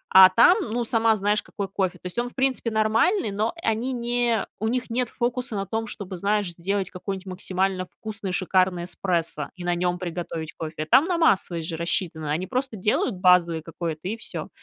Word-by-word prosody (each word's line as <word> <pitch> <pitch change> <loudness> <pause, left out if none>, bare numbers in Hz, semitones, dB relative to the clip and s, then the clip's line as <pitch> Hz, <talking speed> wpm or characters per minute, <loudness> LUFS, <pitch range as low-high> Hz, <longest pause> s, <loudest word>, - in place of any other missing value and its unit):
А 190 0 +11
там, 230 +5 +6
ну, 240 +1 0
сама 225 -1 +3
знаешь, 205 +1 +1
какой 200 -1 -5
кофе. 190 -2 -1
То - - -27
есть 180 +6 -3
он, 245 0 -1
в - - -23
принципе, 265 -3 0
нормальный, 220 - +2
но 215 +3 0
они 230 +4 0
не 240 -1 0
у 220 - -1
них 245 0 -2
нет 245 0 0
фокуса 240 -2 -2
на 195 0 -2
том, 225 +2 -3
чтобы, 195 -3 -6
знаешь, 205 -1 0
сделать 190 +3 -2
какой-нибудь 190 +1 -5
максимально 185 0 -1
вкусный, 215 -1 -6
шикарный 185 -1 +1
эспрессо 170 -5 -2
и 180 - -8
на 175 0 +1
нём 175 0 0
приготовить 170 -2 -5
кофе. 155 -1 -5
Там 270 - +5
на 355 -2 +1
массовость 175 - +2
же 160 - -3
рассчитано. 165 -2 -2
Они 175 +5 -1
просто 260 -1 -2
делают 210 +2 +1
базовый 175 -3 +4
какой-то- 165 -1 -5
и 220 +3 -3
всё. 220 - -7
195 Hz, 195 wpm, -25 LUFS, 175-225 Hz, -, А